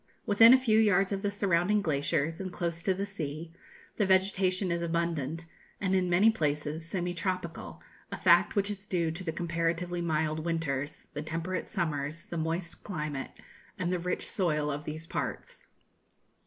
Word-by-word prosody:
Within 225 +3 +8
a 260 - +9
few 225 -4 +3
yards 195 -3 +4
of 195 -1 -1
the 205 - 0
surrounding 200 0 +2
glaciers, 155 +1 0
and 185 -1 -4
close 170 -1 -3
to 190 - +2
the 195 +2 -2
sea, 165 -4 -5 0.4
the 210 - +3
vegetation 190 -1 +2
is 170 0 0
abundant, 165 -2 -1 0.3
and 190 -2 0
in 185 -1 +2
many 195 +6 +5
places 150 -4 -1
semi 175 +1 -2
tropical, 175 -1 -4 0.3
a - - -3
fact - - +4
which 200 0 +1
is 205 0 -7
due 170 -4 0
to 170 +4 -6
the 165 - -2
comparatively 170 +1 -1
mild 155 -1 0
winters, 155 -4 -3
the 150 - -3
temperate 165 +4 -3
summers, 155 -4 -2
the 170 - -6
moist 165 +2 -3
climate, 150 -7 -5 0.4
and 180 -1 -1
the 180 - 0
rich 180 +1 -2
soil 150 -6 0
of 145 +1 -5
these 155 +1 -5
parts. - - -5
170 Hz, 170 wpm, -30 LUFS, 160-190 Hz, 0.4 s, a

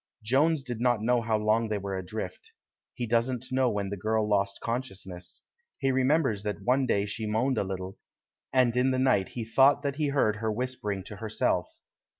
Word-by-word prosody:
Jones 140 +6 +2
doesn't 120 -2 0
know 120 0 +3
how 110 -1 +1
long 110 +1 +1
they 105 - 0
were 100 -1 -4
adrift. 110 - -6 0.4
He 120 - -2
doesn't 120 +2 0
know 130 -1 +2
when 100 -3 -2
the 100 - -3
girl 110 +2 0
lost 100 -1 0
consciousness. 95 -7 -5 0.4
He 135 -1 +1
remembers 130 -4 +2
that 105 0 -4
one 130 +1 +2
day 100 -3 +1
she 110 +2 -3
moaned 115 +4 +1
a - - +1
little, 95 0 -6 0.5
and 125 -2 +3
in 125 +1 +3
the 130 - +1
night 130 -7 +2
he 115 -2 -5
thought 135 +5 +4
that 140 -1 -2
he 155 -2 +1
heard 135 -7 +1
her 110 0 -1
whispering 105 -4 -3
to 100 +1 -9
herself. 110 +1 0
115 Hz, 185 wpm, -28 LUFS, 105-130 Hz, 0.5 s, thought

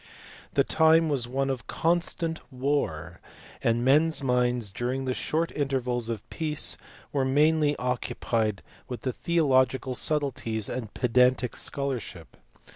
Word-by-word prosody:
The - - +5
time 160 0 +4
was 130 -5 0
one 135 +2 0
of 130 -3 -5
constant 165 -1 0
war, 130 - -2 0.4
and 120 +1 +1
men 150 +5 +5
s 160 -3 -3
minds 125 -4 +1
during 125 +6 -2
the 130 - 0
short 165 +6 -1
intervals 125 -4 -1
of 110 -3 -5
peace 155 -2 0 0.4
were 140 -2 +2
mainly 150 +2 +3
occupied 115 -4 -1 0.2
with 125 -2 -6
theo 160 +5 0
logical 130 -1 +2
subtleties 125 -7 -1
and 115 -5 -4
pedantic 125 0 +2
scholarship. 120 - -4
130 Hz, 125 wpm, -27 LUFS, 120-150 Hz, 0.4 s, The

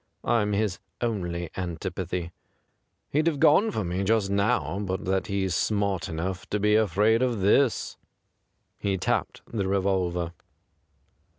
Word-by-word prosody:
I'm 105 -3 +2
his 100 -2 0 0.2
only 85 -8 -2
antipathy. 90 -1 -4 0.8
He'd 155 +3 +2
have 155 -4 +1
gone 180 +12 +5
for 110 - -2
me 90 +2 -2
just 100 -1 +2
now 100 -1 +1
but 95 -2 -3
that 95 +4 0
he's 95 -3 -1
smart 100 -2 0
enough 90 +3 -4
to 105 - 0
be 105 +1 +3
afraid 110 +2 +3
of 120 -5 0
this.' 115 +6 +2 0.8
He 100 -1 0
tapped - - -1
the 100 -4 -2
revolver. 95 -3 0
100 Hz, 130 wpm, -26 LUFS, 90-110 Hz, 0.8 s, gone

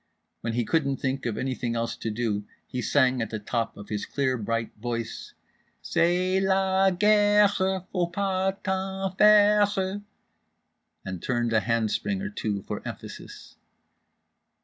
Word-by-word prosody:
When 115 - -3
he 120 0 0
couldn't 140 -3 +1
think 130 -1 -2
of 110 - -3
anything 125 -2 -2
else 115 0 -2
to 115 - -4
do 105 -2 -1 0.2
he 125 - -4
sang 130 -1 +2
at 115 - -2
the 110 - -3
top 115 +2 -3
of 100 - -10
his 105 -1 -3
clear 130 -2 0
bright 115 0 -2
voice: 115 0 -5 0.5
"C'est 180 +2 +2
la 190 0 +3
guerre 205 +2 +5
faut 185 -3 -1
pas 190 0 0
t'en 190 0 -2
faire" 205 -1 +4 1.0
and 95 -2 -5
turned 120 -2 -1
a 110 - +5
handspring 115 - 0
or 205 +2 -4
two 105 - -3
for - - -5
emphasis…. - - -9
145 Hz, 140 wpm, -26 LUFS, 115-190 Hz, 1.0 s, guerre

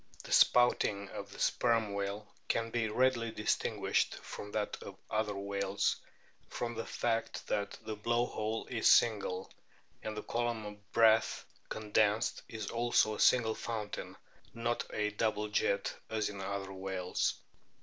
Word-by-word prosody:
The - - -10
spouting 105 -5 +4
of 100 0 -7
the - - -11
Sperm 115 -4 +2
whale 100 +1 -3 0.2
can 115 0 0
be 115 -2 0
readily 120 0 +2
distinguished 105 -1 0
from 105 - -8
that 105 -1 -2
of - - -9
other 105 -1 0
whales 100 0 0 0.5
from 120 -1 -3
the 115 0 -5
fact 115 -1 -1
that 100 -1 -1
the 110 - -4
blow 120 +3 +1
hole 110 -1 -3
is 115 -3 0
single, 100 -5 +3 0.5
and 110 0 -5
the 105 - -4
column 120 -2 -1
of 105 -1 -10
breath 115 -1 +4 0.2
condensed 105 0 +1
is 110 -2 -5
also 120 -2 +3
a - - -6
single 115 -3 +5
fountain, 110 -2 -5 0.4
not 115 +1 -1
a 105 0 0
double 105 0 0
jet, 100 -1 +1 0.2
as 110 -2 0
in 100 -2 -7
other 95 0 -4
whales. 95 -1 -1
110 Hz, 145 wpm, -33 LUFS, 100-115 Hz, 0.5 s, single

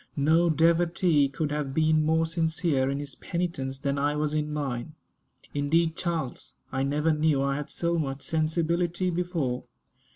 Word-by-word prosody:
No 160 +4 +3
devotee 165 -1 +3
could 145 +2 -3
have 145 -2 -2
been 155 -1 +3
more 160 +1 +2
sincere 160 -4 0
in 140 - -1
his 145 -1 -5
penitence 170 -7 -3
than 140 +1 -1
I 145 +1 +1
was 150 0 -1
in 150 0 -1
mine. 145 0 -3 0.6
Indeed, 160 +3 +1
Charles, 165 -8 -3 0.2
I 135 - -1
never 150 +4 +1
knew 150 -2 +2
I 140 0 0
had 150 - -5
so 170 0 0
much 135 -2 -3
sensibility 170 +3 0
before. 165 -8 -2
155 Hz, 155 wpm, -27 LUFS, 140-165 Hz, 0.6 s, No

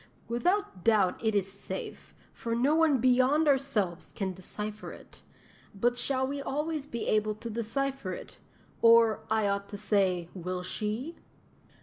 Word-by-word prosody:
Without 295 - 0
doubt 210 -4 +3
it 220 -1 +1
is 195 -1 +1
safe, 200 - -7 0.2
for 230 0 -3
no 260 +6 +3
one 315 -3 +4
beyond 255 +5 +3
ourselves 220 - 0
can 190 -2 -2
decipher 210 +3 -6
it; - - -14 0.5
but 240 +5 +2
shall 260 +2 0
we 280 +1 -3
always 300 +1 -2
be 235 -4 -4
able 215 0 +1
to 230 +2 -7
decipher 235 0 -2
it 180 - -8 0.4
or, 230 -1 +6
I 220 -1 +2
ought 200 0 -1
to 205 - -6
say, 190 -4 +1
will 180 0 -4
she?" 220 - -3
230 Hz, 145 wpm, -29 LUFS, 200-270 Hz, 0.5 s, or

